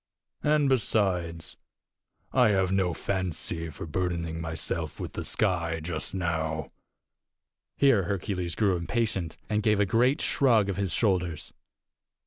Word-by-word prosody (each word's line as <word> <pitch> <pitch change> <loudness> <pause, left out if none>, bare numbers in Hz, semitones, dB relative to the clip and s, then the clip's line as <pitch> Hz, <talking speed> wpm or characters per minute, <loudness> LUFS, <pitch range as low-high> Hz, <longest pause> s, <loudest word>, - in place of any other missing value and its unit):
And, 150 -1 +3
besides, 95 - 0 0.8
I 125 -4 +5
have 95 -2 +2
no 95 -2 +2
fancy 85 -2 -2
for 80 - -7
burdening 85 -1 -2
myself 80 -1 -3
with - - -5
the - - -4
sky 85 -6 0
just 90 +4 -2
now." 80 -4 -2 1.1
Here 130 -10 +4
Hercules 90 -2 -2
grew 100 -4 +2
impatient, 95 -1 -2
and 105 -1 0
gave 105 -1 +2
a 105 - +4
great 125 - +3
shrug 115 -7 +3
of 95 - -2
his 100 -3 -1
shoulders. 90 -5 0
95 Hz, 125 wpm, -28 LUFS, 85-105 Hz, 1.1 s, I